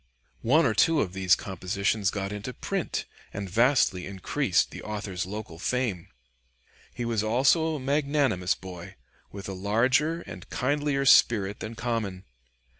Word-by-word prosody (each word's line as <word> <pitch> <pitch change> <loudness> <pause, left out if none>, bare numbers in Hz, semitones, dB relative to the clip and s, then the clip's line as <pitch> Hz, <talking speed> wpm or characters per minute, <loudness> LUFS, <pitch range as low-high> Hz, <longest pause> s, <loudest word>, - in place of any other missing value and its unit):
One 155 +8 +4
or 115 - +2
two 160 +8 +3
of 95 -9 -1
these 95 -1 +4
compositions 100 +2 -1
got 100 -2 -3
into 105 +5 -5
print - - -3 0.3
and 100 0 -5
vastly 115 -2 +2
increased 95 -1 0
the - - -8
author's 100 -4 -4
local 100 -5 -7
fame. 115 -6 -1 0.8
He 120 - -5
was 115 -3 0
also 135 +9 +2
a - - -4
magnanimous 140 -8 +1
boy, 90 -2 -10 0.4
with 100 -1 -8
a 95 - -4
larger 130 - +1
and - - -10
kindlier 145 +1 0
spirit 105 -6 +5
than 110 +1 -6
common. 110 -5 -3
110 Hz, 140 wpm, -27 LUFS, 95-130 Hz, 0.8 s, spirit